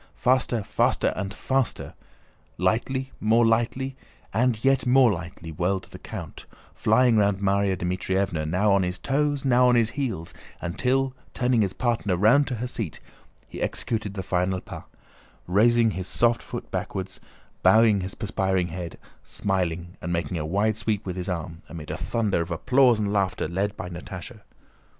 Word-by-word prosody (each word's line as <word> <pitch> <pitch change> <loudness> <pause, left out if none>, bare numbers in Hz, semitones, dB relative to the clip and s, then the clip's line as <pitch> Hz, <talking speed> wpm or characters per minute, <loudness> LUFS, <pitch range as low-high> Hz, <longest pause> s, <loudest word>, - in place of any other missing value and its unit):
Faster, 125 -2 +1
faster, - - +1
and 95 0 -3
faster; 130 +5 -2 0.6
lightly, 130 +8 0
more 115 +2 +4
lightly, 120 +4 +1 0.4
and 120 -1 +1
yet 135 -1 +3
more 125 -2 +6
lightly 90 -2 -6
whirled 90 +4 -1
the - - -10
count, - - -8 0.3
flying 125 -3 +3
round 100 -2 +3
Márya 100 -1 +1
Dmítrievna, 90 -2 -1
now 100 +4 +3
on 100 - +4
his 90 0 -2
toes, 145 +4 0
now 125 -1 +5
on 125 - +4
his 115 -1 +3
heels; 120 - -3 0.3
until, 130 +9 0 0.2
turning 125 -2 +2
his 95 -3 0
partner 115 -7 0
round 120 +9 +5
to 125 - -2
her 120 +2 -3
seat, 115 - -4 0.5
he - - -8
executed 105 -3 -2
the 95 - -3
final 90 0 0
pas, - - -9 0.6
raising 115 +4 +4
his 95 -1 -4
soft 120 0 +2
foot - - -7
backwards, 95 0 -4 0.4
bowing 110 -3 +5
his 95 +1 -5
perspiring 95 -4 -1
head, 85 0 -6 0.3
smiling 90 -2 -2
and 85 - -4
making 85 0 -1
a - - -2
wide 100 +5 +1
sweep 110 -1 -2
with 90 -2 -4
his 90 0 -4
arm, 85 -1 -4
amid 80 -2 -7
a - - -2
thunder 105 -1 0
of 85 - -4
applause 125 +8 +3
and 105 -1 -1
laughter 95 -5 0
led 100 +5 -2
by - - -5
Natásha. 90 +5 -8
100 Hz, 160 wpm, -25 LUFS, 90-120 Hz, 0.6 s, more